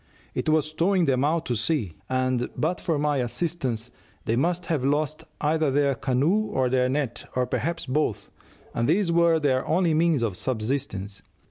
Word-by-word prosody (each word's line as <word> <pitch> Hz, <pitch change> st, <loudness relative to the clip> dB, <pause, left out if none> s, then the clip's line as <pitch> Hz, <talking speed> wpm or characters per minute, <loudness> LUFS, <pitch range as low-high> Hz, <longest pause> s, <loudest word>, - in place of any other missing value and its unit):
It -, -, -1 dB
was 155 Hz, 0 st, +1 dB
towing 180 Hz, +2 st, +2 dB
them 130 Hz, -2 st, +2 dB
out 160 Hz, +2 st, +1 dB
to 125 Hz, -, -1 dB
sea, 110 Hz, -, -1 dB, 0.2 s
and 130 Hz, -1 st, 0 dB
but 170 Hz, +3 st, -1 dB
for 165 Hz, -4 st, 0 dB
my 145 Hz, 0 st, +1 dB
assistance 125 Hz, -3 st, -2 dB, 0.3 s
they 115 Hz, -, +1 dB
must 170 Hz, +6 st, 0 dB
have 155 Hz, -7 st, -1 dB
lost 150 Hz, +2 st, 0 dB
either 155 Hz, 0 st, +1 dB
their 140 Hz, 0 st, +2 dB
canoe 135 Hz, -, +1 dB
or 130 Hz, -1 st, 0 dB
their 130 Hz, -1 st, +2 dB
net, 135 Hz, -3 st, -2 dB
or 125 Hz, 0 st, +2 dB
perhaps 165 Hz, +8 st, -2 dB
both, 130 Hz, -7 st, -1 dB, 0.4 s
and 115 Hz, +3 st, 0 dB
these 180 Hz, +1 st, +2 dB
were 170 Hz, -1 st, +4 dB
their 130 Hz, -3 st, +1 dB
only 170 Hz, 0 st, +2 dB
means 160 Hz, -5 st, +2 dB
of 105 Hz, -5 st, -1 dB
subsistence. 110 Hz, -4 st, -3 dB
145 Hz, 170 wpm, -25 LUFS, 125-165 Hz, 0.4 s, were